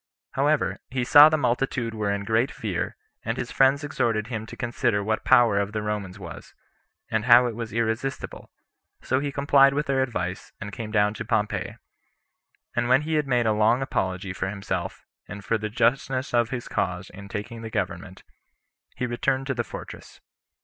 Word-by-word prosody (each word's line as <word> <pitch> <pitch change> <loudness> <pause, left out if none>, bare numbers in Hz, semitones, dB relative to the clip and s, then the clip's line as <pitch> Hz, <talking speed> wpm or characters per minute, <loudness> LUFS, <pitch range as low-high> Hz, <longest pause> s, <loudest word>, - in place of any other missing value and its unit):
However, 145 +2 +1
he 125 -1 -1
saw 145 +5 +9
the 155 - +1
multitude 125 -3 -1
were 105 -2 -2
in 100 0 -2
great 110 +5 +1
fear, 100 -6 -4 0.3
and - - -2
his - - -4
friends 135 +2 +3
exhorted 115 -7 0
him 110 -3 -4
to - - -10
consider 120 -3 0
what 110 +1 0
the - - -8
power 115 -4 +6
of 100 +1 -2
the 105 -1 -2
Romans 105 -3 -4
was, 85 -6 -10 0.6
and 110 0 0
how 125 0 +7
it 120 - -2
was 115 -1 -5
irresistible; 115 +4 -3 0.5
so 130 - +1
he 140 0 -2
complied 140 0 +4
with 150 +1 0
their 135 -2 +1
advice, 95 -8 -3
and 100 - -6
came 110 -2 -5
down 105 -1 +2
to 115 - -5
Pompey; 110 -2 -1 1.0
and 120 0 0
when 130 +3 +4
he 160 +1 -3
had 150 -2 +1
made 125 -3 +2
a 110 - +3
long 110 +5 +3
apology 95 -5 -2
for 95 - -3
himself, 95 -2 -4 0.2
and 100 -1 -9
for 115 +3 +1
the 110 0 -3
justness 130 +4 0
of 120 -1 +3
his 120 -1 -5
cause 90 0 -2
in 100 0 -10
taking 115 +3 -6
the 115 - -6
government, - - -4 0.7
he 125 - -2
returned 130 +2 -1
to 135 - -1
the 120 -2 -1
fortress. - - -10
115 Hz, 190 wpm, -25 LUFS, 105-130 Hz, 1.0 s, saw